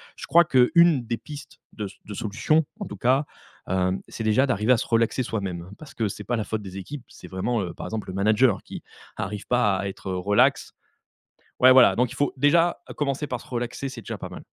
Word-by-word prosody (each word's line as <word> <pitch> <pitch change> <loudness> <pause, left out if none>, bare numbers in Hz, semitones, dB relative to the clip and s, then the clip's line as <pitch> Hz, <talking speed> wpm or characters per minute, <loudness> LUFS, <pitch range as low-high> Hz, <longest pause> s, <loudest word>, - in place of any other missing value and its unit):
Je - - -9
crois 170 +1 +6
qu'une 140 +1 +4
des 115 0 -2
pistes 145 +3 -11
de 105 - -5 0.2
de 105 - -7
solution, 115 +9 +1 0.2
en 205 - -4
tout - - -8
cas, 130 +4 +2 0.4
hem, 95 0 0
c'est 115 - -6
déjà 110 +5 +3
d'arriver 120 -3 +1
à - - +3
se - - -3
relaxer 115 +2 +1
soi-même. 95 -6 -4
Parce 155 - -12
que 110 - 0
c'est 100 - -6
pas 120 - -1
la 110 - -1
faute 110 +1 -4
des 95 -1 -9
équipes, 130 +8 -7
c'est - - -13
vraiment, 100 +6 -2
heu 85 -2 -5
par - - -7
exemple, 110 -1 -5
le - - -5
manager 105 +3 +3
qui - - -9 0.3
arrive 100 +1 -5
pas 105 -6 +2
à 95 +1 -3
être 95 0 -6
relax 95 +3 +2 0.9
ouais, 130 +1 +8
voilà, 130 -2 +7
donc 125 +1 +1
il - - -8
faut 145 - 0
déjà 165 +6 +3 0.2
commencer 145 0 -1
par 125 -2 -4
se - - -15
relaxer, 120 +2 -4
c'est 135 - -8
déjà - - -6
pas - - -7
mal. - - -11
115 Hz, 220 wpm, -25 LUFS, 100-130 Hz, 0.9 s, ouais